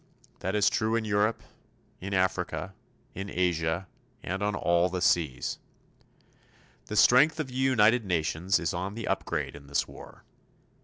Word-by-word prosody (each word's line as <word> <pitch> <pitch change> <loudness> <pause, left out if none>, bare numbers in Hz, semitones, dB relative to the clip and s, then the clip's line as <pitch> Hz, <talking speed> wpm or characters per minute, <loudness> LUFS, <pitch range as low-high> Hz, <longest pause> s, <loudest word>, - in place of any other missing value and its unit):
That 95 +2 -2
is 105 -1 +3
true 110 0 +1
in 115 -1 -1
Europe, 105 +1 +1 0.6
in 100 +1 -4
Africa, 95 0 -1 0.4
in 100 +2 -6
Asia, 85 -1 0 0.4
and 95 +2 -3
on 105 0 0
all 85 +1 +2
the 90 +1 -3
seas. 80 -7 0 1.3
The - - -4
strength 150 +6 +5
of 150 -4 -2
the - - -11
United 125 -3 +3
Nations 90 +1 0
is 85 - -2
on 95 +4 -4
the 115 -1 -5
upgrade - - -2
in 70 -1 -13
this 70 - 0
war. - - -13
95 Hz, 150 wpm, -28 LUFS, 85-110 Hz, 1.3 s, strength